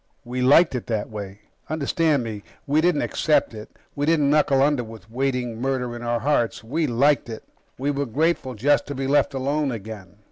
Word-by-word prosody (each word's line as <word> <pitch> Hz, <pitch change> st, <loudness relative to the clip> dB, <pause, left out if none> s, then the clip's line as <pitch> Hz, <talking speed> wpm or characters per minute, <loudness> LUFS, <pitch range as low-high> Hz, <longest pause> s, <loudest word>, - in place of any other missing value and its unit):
We 125 Hz, +1 st, -3 dB
liked 145 Hz, +6 st, +5 dB
it 125 Hz, -, -4 dB
that 110 Hz, -2 st, -2 dB
way. 100 Hz, -1 st, -7 dB, 0.3 s
Understand 155 Hz, -1 st, +1 dB
me 110 Hz, -3 st, -6 dB, 0.2 s
we 150 Hz, +2 st, +2 dB
didn't 170 Hz, -3 st, +2 dB
accept 155 Hz, -6 st, +1 dB
it, 105 Hz, -1 st, -9 dB, 0.3 s
we 145 Hz, 0 st, -1 dB
didn't 150 Hz, -4 st, +3 dB
knuckle 150 Hz, -2 st, +3 dB
under 145 Hz, -3 st, +2 dB
with 110 Hz, -2 st, -12 dB
waiting 125 Hz, -2 st, -2 dB
murder 125 Hz, -2 st, -2 dB
in 120 Hz, -, -8 dB
our 120 Hz, -1 st, -1 dB
hearts 125 Hz, -7 st, 0 dB
we 150 Hz, +7 st, -1 dB
liked 135 Hz, +2 st, +2 dB
it. 110 Hz, -, -7 dB, 0.3 s
We 140 Hz, +3 st, -1 dB
were 140 Hz, -1 st, -2 dB
grateful 140 Hz, 0 st, 0 dB
just 140 Hz, +7 st, +2 dB
to 145 Hz, -, -5 dB
be 135 Hz, +1 st, -3 dB
left 140 Hz, 0 st, +2 dB
alone 140 Hz, +2 st, 0 dB
again. 105 Hz, -4 st, -8 dB
130 Hz, 190 wpm, -23 LUFS, 115-145 Hz, 0.3 s, liked